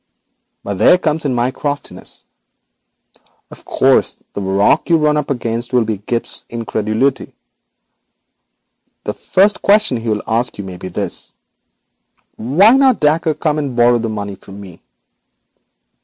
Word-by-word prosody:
But 100 -2 -4
there 180 - +6
comes 160 -3 -1
in 130 -3 0
my 120 +2 +1
craftiness. 145 +1 -5 1.3
Of - - -13
course, - - +2 0.2
the 100 - -4
rock 100 - +2
you 165 - +5
run 150 -1 +2
up 150 -2 -2
against 120 -2 -3
will 125 -2 +3
be 110 -2 -3
Gibbes's 115 +3 -4
incredulity. 115 +2 -1 1.7
The - - -3
first 200 +2 +2
question 205 - +3
he 115 0 -4
will 105 -1 -1
ask 115 +2 0
you 100 - -5
may 95 -2 -8
be 95 - -7
this: 90 - -4 1.0
"Why 160 - +4
did 265 - +4
not 265 -3 +4
Dacre 155 +1 +2
come 155 0 -1
and 140 -4 -3
borrow 120 0 +4
the 115 0 -3
money 100 -2 -4
from 95 +1 -12
me?" 95 -4 -12
120 Hz, 145 wpm, -17 LUFS, 110-150 Hz, 1.7 s, there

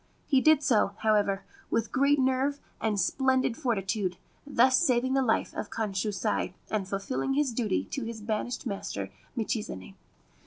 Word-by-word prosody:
He 270 -3 +3
did 310 -1 +5
so, 215 -6 +3
however, 205 -2 +2 0.3
with 230 -1 0
great 280 +2 +3
nerve 265 +2 +1 0.2
and 215 -2 0
splendid 260 +5 +2
fortitude, 200 - -1 0.3
thus 260 -1 +4
saving 260 -5 +2
the 270 - +3
life 235 -4 +1
of 205 - -4
Kanshusai, 200 -4 -1 0.2
and 205 -3 -1
fulfilling 200 +7 -2
his 285 -4 +1
duty 225 -4 0
to 270 - -2
his 225 0 -5
banished 215 +3 -3
master 200 - -4 0.3
Michizane. 210 - -3
230 Hz, 145 wpm, -29 LUFS, 205-265 Hz, 0.3 s, did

